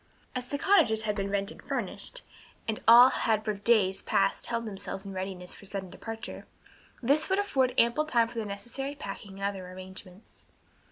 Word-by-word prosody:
As 250 Hz, -1 st, -4 dB
the 285 Hz, -, -2 dB
cottages 285 Hz, -, +4 dB
had 210 Hz, -1 st, 0 dB
been 200 Hz, -1 st, -2 dB
rented 200 Hz, +1 st, -2 dB
furnished, -, -, -2 dB, 0.4 s
and 220 Hz, -1 st, -2 dB
all 240 Hz, +3 st, +10 dB
had 220 Hz, -1 st, +1 dB
for 215 Hz, -, 0 dB
days 200 Hz, -2 st, +2 dB
past 195 Hz, 0 st, +1 dB
held 230 Hz, 0 st, -2 dB
themselves 200 Hz, -1 st, -5 dB
in 195 Hz, -, -6 dB
readiness 185 Hz, -1 st, -5 dB
for 200 Hz, -, -11 dB
sudden 190 Hz, -2 st, -5 dB
departure, 225 Hz, 0 st, -7 dB, 0.6 s
this 285 Hz, +8 st, +3 dB
would 380 Hz, -, +2 dB
afford 265 Hz, -11 st, +1 dB
ample 235 Hz, +6 st, +3 dB
time 235 Hz, -6 st, +3 dB
for 230 Hz, 0 st, -6 dB
the 220 Hz, -, -3 dB
necessary 240 Hz, +8 st, -5 dB
packing 200 Hz, -5 st, -7 dB
and -, -, -6 dB
other 195 Hz, -2 st, -3 dB
arrangements. 185 Hz, +1 st, -11 dB
215 Hz, 175 wpm, -29 LUFS, 195-245 Hz, 0.6 s, all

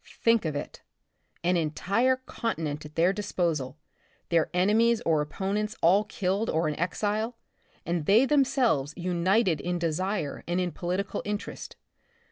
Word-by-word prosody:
Think 230 Hz, -4 st, +3 dB
of 155 Hz, -2 st, -2 dB
it! 145 Hz, -, -6 dB, 0.6 s
An 180 Hz, +1 st, +2 dB
entire 200 Hz, +11 st, +1 dB
continent 165 Hz, -, -4 dB
at 150 Hz, -, -19 dB
their 175 Hz, +3 st, +3 dB
disposal, 170 Hz, -9 st, -2 dB, 0.5 s
their 165 Hz, -2 st, +2 dB
enemies 215 Hz, +6 st, +3 dB
or 160 Hz, -2 st, +3 dB
opponents 205 Hz, +7 st, -2 dB
all 195 Hz, +5 st, +4 dB
killed 200 Hz, +2 st, -1 dB
or 160 Hz, 0 st, +1 dB
in 150 Hz, -, -1 dB
exile, 215 Hz, +6 st, -1 dB, 0.5 s
and 170 Hz, -3 st, -2 dB
they 220 Hz, +6 st, +6 dB
themselves 260 Hz, -, +2 dB
united 180 Hz, +1 st, +1 dB
in 180 Hz, 0 st, -1 dB
desire 170 Hz, -1 st, -2 dB
and 175 Hz, +1 st, 0 dB
in 180 Hz, -1 st, -1 dB
political 180 Hz, +4 st, -3 dB
interest. 210 Hz, +1 st, -5 dB
185 Hz, 135 wpm, -27 LUFS, 165-215 Hz, 0.6 s, they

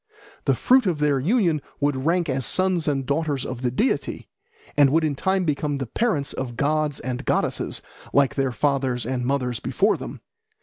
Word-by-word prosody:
The -, -, +3 dB
fruit 255 Hz, -4 st, +4 dB
of 175 Hz, -4 st, +1 dB
their 150 Hz, -2 st, +2 dB
union 170 Hz, -, +2 dB, 0.2 s
would 145 Hz, -1 st, 0 dB
rank 170 Hz, 0 st, +2 dB
as 130 Hz, -1 st, -1 dB
sons 185 Hz, +3 st, +2 dB
and 135 Hz, -3 st, 0 dB
daughters 145 Hz, -1 st, -1 dB
of 130 Hz, -1 st, -5 dB
the 125 Hz, -, +1 dB
deity, 215 Hz, -, -1 dB, 0.5 s
and 145 Hz, -2 st, +6 dB
would 160 Hz, +4 st, +2 dB
in 155 Hz, -2 st, +1 dB
time 190 Hz, +6 st, 0 dB
become 150 Hz, -1 st, -1 dB
the 135 Hz, -, -3 dB
parents 150 Hz, -, -1 dB
of 120 Hz, -3 st, -5 dB
gods 150 Hz, 0 st, 0 dB
and 125 Hz, 0 st, -4 dB
goddesses, -, -, -1 dB, 0.3 s
like 135 Hz, -5 st, +3 dB
their 135 Hz, +2 st, 0 dB
fathers 130 Hz, -1 st, 0 dB
and 125 Hz, 0 st, -2 dB
mothers 125 Hz, -2 st, -1 dB
before -, -, +1 dB
them. -, -, -8 dB
140 Hz, 180 wpm, -24 LUFS, 130-160 Hz, 0.5 s, and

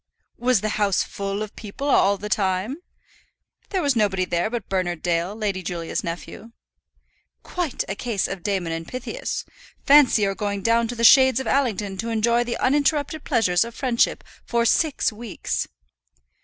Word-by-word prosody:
"Was 245 Hz, -4 st, +2 dB
the 215 Hz, -, -1 dB
house 200 Hz, -2 st, +2 dB
full 200 Hz, +1 st, -4 dB
of 215 Hz, -, -9 dB
people 220 Hz, +7 st, -6 dB
all 200 Hz, -7 st, +4 dB
the 210 Hz, -, -6 dB
time?" 200 Hz, +5 st, 0 dB, 0.9 s
"There 380 Hz, -4 st, -1 dB
was 280 Hz, -3 st, +2 dB
nobody 195 Hz, -4 st, +1 dB
there 175 Hz, +3 st, -1 dB
but 230 Hz, -3 st, -4 dB
Bernard 180 Hz, -3 st, -2 dB
Dale, 175 Hz, +3 st, 0 dB
Lady 205 Hz, -4 st, -2 dB
Julia's 170 Hz, -2 st, -4 dB
nephew." 175 Hz, +7 st, -7 dB, 0.9 s
"Quite 345 Hz, -7 st, -3 dB
a 195 Hz, -, -2 dB
case 215 Hz, -1 st, -2 dB
of 195 Hz, -2 st, -6 dB
Damon 190 Hz, -3 st, -1 dB
and 165 Hz, 0 st, -4 dB
Pythias. 255 Hz, -, -4 dB, 0.4 s
Fancy 275 Hz, -6 st, +6 dB
your 195 Hz, -1 st, +1 dB
going 200 Hz, 0 st, -3 dB
down 230 Hz, 0 st, +3 dB
to 245 Hz, -, -5 dB
the 230 Hz, -, -3 dB
shades 260 Hz, +1 st, +7 dB
of 265 Hz, -, -4 dB
Allington 210 Hz, -8 st, 0 dB
to 225 Hz, +4 st, -3 dB
enjoy 235 Hz, +2 st, +2 dB
the 240 Hz, 0 st, -3 dB
uninterrupted 290 Hz, +2 st, +1 dB
pleasures 185 Hz, -9 st, +2 dB
of 235 Hz, 0 st, -9 dB
friendship 250 Hz, -4 st, +1 dB, 0.2 s
for 235 Hz, -1 st, 0 dB
six 295 Hz, -2 st, +2 dB
weeks." 225 Hz, -1 st, -4 dB
215 Hz, 165 wpm, -23 LUFS, 195-250 Hz, 0.9 s, shades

